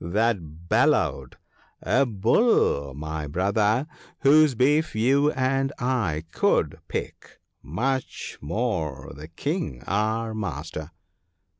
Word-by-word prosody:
that 85 -4 -1
bellowed - - +1 0.3
— - - -38
a 140 - +2
bull, 105 - +2
my 80 +1 -5
brother 105 - +1 0.2
— - - -26
whose 150 -1 +5
beef 145 +3 +2
you 135 +7 +3
and 135 +1 0
I 115 - -1
could - - +1
pick, - - -6 0.2
much 125 - -3
more 80 - -3
the 75 +2 -9
King 85 - -4
our 110 +2 -1
master.' 80 -6 -5
110 Hz, 110 wpm, -25 LUFS, 80-130 Hz, 0.3 s, whose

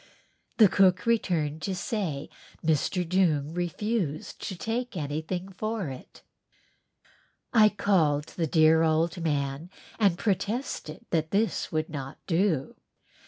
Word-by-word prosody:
The 215 - +8
cook 185 0 +3
returned 165 -10 0
to 190 +4 -2
say 180 - -3 0.4
Mr. 165 +3 +1
Doong 160 -5 +1
refused 175 -2 -2
to 190 - -4
take 230 +3 -3
anything 160 +5 -3
for 215 -2 -3
it. 130 -1 -11 1.3
I 215 -2 +7
called 170 -8 +2
the 165 -2 0
dear 160 +1 +5
old 165 +2 +1
man 145 +1 -1 0.3
and 195 -5 +3
protested 200 - -2
that 160 -2 +1
this 215 +5 0
would 155 -1 -1
not 140 -3 -6
do. 165 -5 0
175 Hz, 115 wpm, -27 LUFS, 155-200 Hz, 1.3 s, The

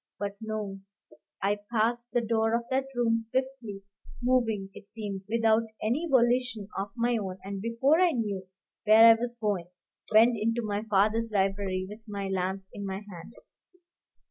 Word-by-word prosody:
But 200 -1 -4
no; 215 -3 -4 0.6
I 205 +1 +1
passed 235 +1 0
the 240 - +2
door 225 0 +1
of 235 - -1
that 265 +1 +1
room 230 -1 +2
swiftly, 230 -3 -4 0.4
moving, 230 -6 +1
it 200 - -13
seemed, 200 -3 -6
without 225 0 +3
any 260 +11 -1
volition 240 -4 +2
of 195 +1 -3
my 240 0 +1
own, 190 -3 -4
and 195 0 -5
before 235 - +2
I 365 - +5
knew 205 -8 -3 0.4
where 220 +2 +8
I - - +10
was 240 +1 -3
going, 200 -6 -1 0.4
went 225 +2 +6
into 230 +2 0
my 205 -1 -1
father's 215 +3 +2
library 195 -2 0
with 210 +2 -9
my 200 -2 -4
lamp 190 +1 -2
in 200 - -6
my 195 +1 -4
hand. 175 +5 -11
220 Hz, 160 wpm, -28 LUFS, 200-235 Hz, 0.6 s, I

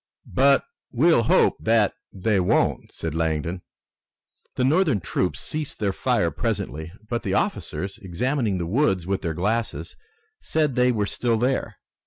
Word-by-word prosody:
"But 140 +1 +4 0.3
we'll 150 +1 +4
hope 115 - +3
that 110 -2 +3 0.2
they 100 +1 +1
won't," 90 - +1
said 80 -2 -5
Langdon. 80 +2 -1 0.9
The - - 0
Northern 150 - +3
troops 90 +1 -2
ceased 150 -2 -4
their 100 -2 0
fire - - +1
presently, 80 +6 -3 0.2
but 120 +1 -2
the - - -1
officers, 95 +1 -2
examining 110 +3 -1
the 85 - -2
woods 95 - +1
with 95 +1 -1
their 85 -3 -3
glasses, 110 +6 -2 0.4
said 155 -3 0
they 125 +1 +3
were 105 -4 0
still 115 +2 0
there. 120 -2 0
110 Hz, 145 wpm, -24 LUFS, 90-125 Hz, 0.9 s, But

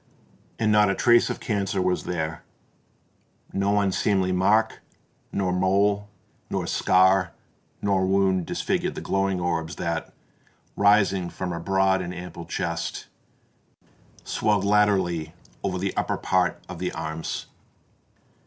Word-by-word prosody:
And 110 -1 +1
not 105 -1 +5
a 100 - +1
trace 120 +2 +4
of - - -3
cancer 100 -3 -1
was 90 0 0
there: 80 -2 -3 1.1
no 100 +1 +2
unseemly 95 -1 +1
mark, 105 +5 +2 0.5
nor 95 -2 0
mole, 100 +2 +1 0.4
nor - - -2
scar, 95 -1 +3 0.5
nor 95 -2 +2
wound 95 -2 +2
disfigured - - -1
the - - -5
glowing 95 -1 0
orbs 85 -1 -2
that, 85 -1 -3 0.6
rising 100 -3 +3
from 90 -1 -4
a 85 - -4
broad 95 +1 +2
and 90 0 -5
ample 90 -1 -8
chest, 85 0 -4 1.1
swelled 105 -2 0
laterally 95 -6 +2 0.3
over 95 -2 -2
the 95 +1 -2
upper - - -1
part - - +1
of - - -8
the - - -2
arms. 80 0 -4
95 Hz, 125 wpm, -25 LUFS, 90-100 Hz, 1.1 s, not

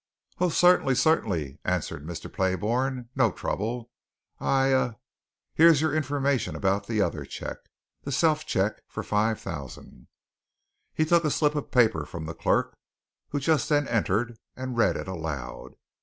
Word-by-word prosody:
"Oh, 180 - +3
certainly, 175 -6 +4
certainly," 90 - +1
answered - - -2
Mr. 85 +1 -6
Playbourne. 115 +7 -1
"No 130 -6 +3
trouble. 115 +6 -3 0.5
I'll - - -3 0.3
ah, 125 -3 +1 0.6
here's 165 -2 +6
your 155 -1 +1
information 140 -3 0
about 100 +1 0
the 110 -3 +1
other - - -2
cheque - - -8 0.3
the 140 - -5
self 155 +2 +2
cheque 100 +3 0
for - - -6
five 110 +1 +1
thousand." 70 -5 -8 0.9
He 155 - +2
took 170 +1 +4
a 155 - +2
slip 150 0 +2
of 145 -2 -3
paper 110 - +3
from 80 +1 -6
the 80 - -5
clerk - - 0 0.5
who 145 - -1
just 150 -1 +1
then 145 -1 +2
entered, 115 +1 0 0.2
and 130 -1 -5
read 115 - +3
it - - -6
aloud. 80 -8 -6
120 Hz, 150 wpm, -27 LUFS, 95-145 Hz, 0.9 s, here's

